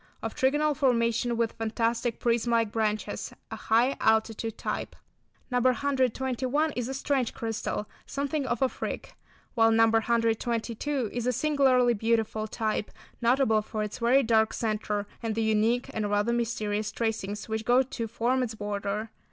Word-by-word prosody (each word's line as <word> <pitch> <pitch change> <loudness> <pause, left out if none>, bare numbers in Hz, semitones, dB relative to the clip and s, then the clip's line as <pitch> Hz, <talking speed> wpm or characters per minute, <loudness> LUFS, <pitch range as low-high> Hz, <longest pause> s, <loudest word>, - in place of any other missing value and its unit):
Of - - -3
trigonal 295 +3 +2
formation 235 -3 +1
with 230 -1 +1
fantastic 230 +1 -1
prism 235 0 +1
like 230 -2 +2
branches; 215 -1 -2 0.2
a - - -3
high 240 +5 +2
altitude 220 0 +1
type. - - -4 0.6
No. 250 - +2
121 260 +2 +1
is 245 -1 -2
a 265 - -4
strange 270 -3 -1
crystal, 225 -2 -3 0.2
something 280 0 -2
of 240 0 0
a - - +5
"freak," - - -5 0.4
while 225 -2 +4
No. 225 0 +5
122 230 +2 0
is 240 0 -2
a - - +3
singularly 260 -3 +3
beautiful 220 -1 0
type, 215 -1 -2 0.3
notable 235 -2 +3
for 215 0 -4
its 210 +3 -5
very 250 +4 +4
dark 220 -1 +3
centre, 210 -2 -2 0.2
and 225 -2 -2
the 225 - 0
unique 220 +3 +2
and 210 -2 -1
rather 205 +3 +1
mysterious 215 -3 -1
tracings 215 -2 -3
which 220 0 -2
go 245 +3 +4
to 235 -3 -5
form 240 +3 0
its 230 -3 -2
border. 205 +1 -3
230 Hz, 150 wpm, -28 LUFS, 220-250 Hz, 0.6 s, a